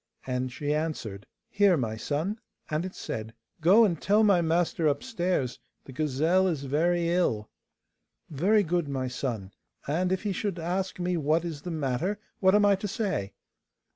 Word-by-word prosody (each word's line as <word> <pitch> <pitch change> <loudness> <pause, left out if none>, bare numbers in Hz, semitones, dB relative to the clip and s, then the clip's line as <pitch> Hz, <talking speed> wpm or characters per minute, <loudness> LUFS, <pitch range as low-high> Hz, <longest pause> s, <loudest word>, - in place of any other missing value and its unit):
And 125 0 -2
she 145 +3 -2
answered, 145 -11 -3 0.2
'Here, 200 -6 +4
my 115 -5 -2
son?' 155 - -2 0.3
And 155 +4 0
it 185 - -11
said, 110 +1 -5 0.3
'Go 200 +8 +7
and 170 -7 -1
tell 210 +2 +4
my 200 -5 +5
master 165 -1 +1
upstairs 175 - -1 0.3
the - - -10
gazelle 155 +7 +2
is 155 -6 -1
very 170 +5 +1
ill.' 140 -12 0 0.8
'Very 195 +9 +2
good, 175 -2 0
my 135 -2 -2
son; 120 -6 -4 0.4
and 175 +6 0
if 190 +1 -1
he 205 - -1
should 195 -1 -2
ask 180 +3 -2
me 180 0 0
what 160 +2 +1
is 160 -4 -5
the 175 - -6
matter, 160 +5 -1 0.2
what 190 +1 +5
am 210 0 +5
I 200 - +6
to 205 - -4
say? 190 - -2
165 Hz, 170 wpm, -28 LUFS, 140-185 Hz, 0.8 s, Go